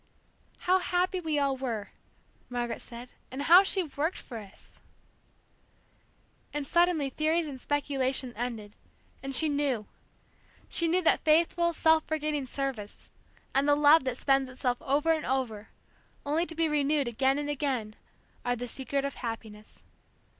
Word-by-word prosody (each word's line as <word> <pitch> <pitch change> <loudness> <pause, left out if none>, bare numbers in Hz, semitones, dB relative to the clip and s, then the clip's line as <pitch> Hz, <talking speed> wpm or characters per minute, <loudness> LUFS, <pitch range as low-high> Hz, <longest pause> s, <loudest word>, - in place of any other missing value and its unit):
"How 370 +1 +4
happy 365 +1 0
we 315 -3 -1
all 280 -1 +1
were!" 235 -6 -4 0.6
Margaret 240 -1 -3
said; 240 +1 -10 0.2
"and 265 +2 -5
how 350 +5 +8
she 385 -1 +1
worked 315 +2 -2
for 235 -3 -8
us!" 200 -2 -14 1.7
And 295 -1 -3
suddenly 340 -5 +2
theories 315 +4 +1
and 270 -4 -7
speculation 270 -3 -1
ended, 225 -3 -5 0.5
and 270 0 -4
she 315 - +4
knew. 285 -7 0 0.8
She 335 - +2
knew 360 +3 +2
that - - +4
faithful, 340 +2 +3
self 320 -1 +3
forgetting 305 -3 -1
service, 255 -6 -5 0.4
and 275 +2 +2
the 290 - +5
love 295 +1 +6
that 255 -1 -2
spends 270 -1 +2
itself 250 -1 -2
over 290 +4 +1
and 315 -1 0
over, 235 -5 -2 0.6
only 315 +4 0
to 325 - -3
be 330 0 +2
renewed 295 -2 +1
again 265 +4 +1
and 290 0 -3
again, 265 -7 -2 0.5
are 245 0 0
the 245 +1 -5
secret 275 +3 -2
of 280 - -3
happiness. 220 -3 -7
280 Hz, 145 wpm, -29 LUFS, 250-315 Hz, 1.7 s, how